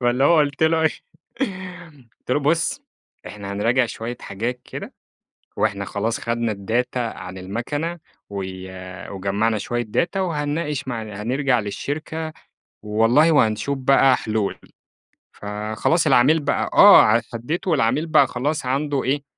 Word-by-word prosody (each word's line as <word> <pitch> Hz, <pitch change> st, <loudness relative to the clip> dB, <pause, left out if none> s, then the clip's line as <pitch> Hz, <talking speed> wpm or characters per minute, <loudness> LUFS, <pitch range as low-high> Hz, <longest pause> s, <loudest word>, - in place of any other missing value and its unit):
فاللي 125 Hz, +2 st, +2 dB
هو 170 Hz, +2 st, +5 dB
قُلت 145 Hz, 0 st, +1 dB
له 160 Hz, 0 st, +3 dB
إيه، 160 Hz, -, +5 dB, 1.3 s
قُلت -, -, -11 dB
له: 145 Hz, -, +2 dB
"بُص 165 Hz, -, +1 dB, 0.5 s
إحنا 100 Hz, -1 st, -7 dB
هنراجع 120 Hz, +5 st, +2 dB
شويّة 115 Hz, +2 st, -6 dB
حاجات 120 Hz, +5 st, -4 dB
كده، -, -, -8 dB, 0.6 s
وإحنا 100 Hz, -2 st, 0 dB
خلاص 110 Hz, +4 st, -2 dB
خدنا 115 Hz, -1 st, -1 dB
الداتا 115 Hz, +6 st, -2 dB
عن 95 Hz, -6 st, -5 dB
المكنة 145 Hz, -, -4 dB, 0.3 s
و 100 Hz, -1 st, -4 dB, 0.7 s
وجمَّعنا 100 Hz, +3 st, 0 dB
شويّة 120 Hz, +3 st, -2 dB
data 180 Hz, -, +1 dB
وهنناقش 150 Hz, -5 st, -2 dB
مع 115 Hz, -3 st, -3 dB
هَنرجع 120 Hz, +5 st, 0 dB
للشركة، 155 Hz, +10 st, -4 dB, 0.5 s
والله 115 Hz, +10 st, +3 dB
وهَنشوف 130 Hz, 0 st, +2 dB
بقى 135 Hz, 0 st, +4 dB
حلول." 110 Hz, -2 st, -2 dB, 0.7 s
فخلاص 105 Hz, +10 st, -1 dB
العميل 145 Hz, +7 st, +5 dB
بقى 145 Hz, -1 st, -1 dB
آه، 115 Hz, +2 st, +8 dB
هديته 155 Hz, +10 st, -3 dB
والعميل 150 Hz, +3 st, +1 dB
بقى 155 Hz, -1 st, +5 dB
خلاص 145 Hz, +3 st, -2 dB
عنده 140 Hz, +1 st, -1 dB
إيه 140 Hz, +2 st, 0 dB
125 Hz, 125 wpm, -22 LUFS, 110-150 Hz, 1.3 s, آه